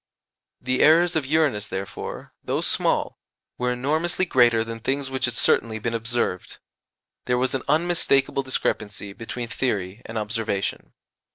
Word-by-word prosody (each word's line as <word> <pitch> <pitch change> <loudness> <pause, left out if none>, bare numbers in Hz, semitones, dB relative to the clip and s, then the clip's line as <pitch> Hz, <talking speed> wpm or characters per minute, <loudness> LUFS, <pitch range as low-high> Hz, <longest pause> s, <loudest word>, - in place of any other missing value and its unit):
The 130 +1 0
errors 170 +3 +5
of 150 -4 0
Uranus 145 -9 +1
therefore, 95 +1 -6
though - - -1
small, - - +1 0.4
were 125 0 +1
enormously 155 +8 0
greater 120 -7 +4
than 115 0 -6
things 135 +3 -2
which 130 -1 0
had 120 -1 -3
certainly 115 -1 +2
been 115 +2 -3
observed; 115 -5 -1 0.7
there 125 0 +1
was 130 +1 +1
an 135 - -1
unmistakable 150 -3 +2
discrepancy 105 -6 -2
between 120 +2 -6
theory 105 -4 -2
and 115 - -5
observation. 105 -2 -2
125 Hz, 140 wpm, -24 LUFS, 110-135 Hz, 0.7 s, errors